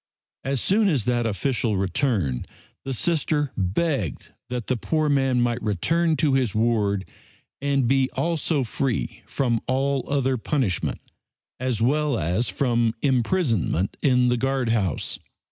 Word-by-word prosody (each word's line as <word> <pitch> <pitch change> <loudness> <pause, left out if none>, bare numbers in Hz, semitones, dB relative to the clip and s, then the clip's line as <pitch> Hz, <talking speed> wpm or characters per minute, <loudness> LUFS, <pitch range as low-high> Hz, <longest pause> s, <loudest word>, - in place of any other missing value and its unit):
As 135 0 -1
soon 205 - +3
as 135 - 0
that 120 -1 +1
official 110 +1 0
returned 95 - 0 0.4
the 135 - -3
Sister 150 0 0
begged 105 - -1 0.2
that 125 -3 -3
the 130 - 0
poor 155 +5 0
man 135 -3 +2
might 120 0 0
return 160 - +1
to 145 -1 +2
his 125 -7 +1
ward 105 -3 +1 0.5
and 140 -3 +1
be 135 +1 +3
also 160 -3 0
free 125 0 -2
from 120 -4 0
all 135 +1 +1
other 135 -2 +1
punishment, 115 - -1 0.6
as 125 -3 -1
well 145 +1 +2
as 90 +7 0
from 120 -4 +1
imprisonment 120 - +1
in 125 -3 +3
the 120 - +2
guard 135 -1 0
house. 100 -8 0
125 Hz, 135 wpm, -24 LUFS, 110-140 Hz, 0.6 s, soon